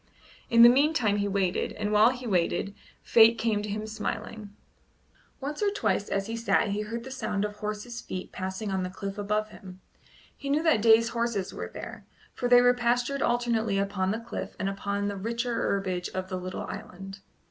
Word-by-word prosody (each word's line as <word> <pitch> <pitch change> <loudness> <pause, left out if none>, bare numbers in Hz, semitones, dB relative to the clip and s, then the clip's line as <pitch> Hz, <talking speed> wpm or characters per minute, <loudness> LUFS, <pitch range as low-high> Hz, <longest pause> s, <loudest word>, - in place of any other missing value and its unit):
In 230 0 +7
the - - +11
meantime 250 -5 +3
he 205 0 0
waited, 195 -2 0
and 210 0 -3
while 210 +2 +6
he 255 0 -5
waited 195 -1 0 0.3
Fate 230 0 +6
came 220 -2 0
to 210 - -5
him 215 +1 -3
smiling. 220 0 -5 0.9
Once 290 +5 -5
or 415 - +3
twice 400 - -1
as 195 0 -1
he 225 +2 -4
sat 230 -2 +1
he 205 +1 -1
heard 230 +2 -5
the 265 - -9
sound 210 -6 -2
of 210 0 -6
horse's 215 +3 -5
feet 185 0 -6
passing 190 +2 -4
on 190 -1 0
the 185 - -3
cliff 195 +2 -6
above 210 +1 -1
him. 185 -3 -12 0.6
He 280 - -6
knew 295 +3 +2
that 315 -10 +3
Day's 225 +1 +5
horses 235 -5 -2
were - - -5
there, - - -9 0.3
for 245 - -2
they 245 0 +8
were 245 0 +5
pastured 245 +3 0
alternately 235 -4 +1
upon 195 -1 0
the 215 +3 -1
cliff 230 - -6
and 195 - -2
upon 200 +1 -2
the 200 -1 -3
richer 235 +4 -2
herbage 190 -5 -1
of 185 0 -3
the 185 - -3
little 185 0 -5
island. 195 +1 -8
215 Hz, 195 wpm, -28 LUFS, 195-235 Hz, 0.9 s, the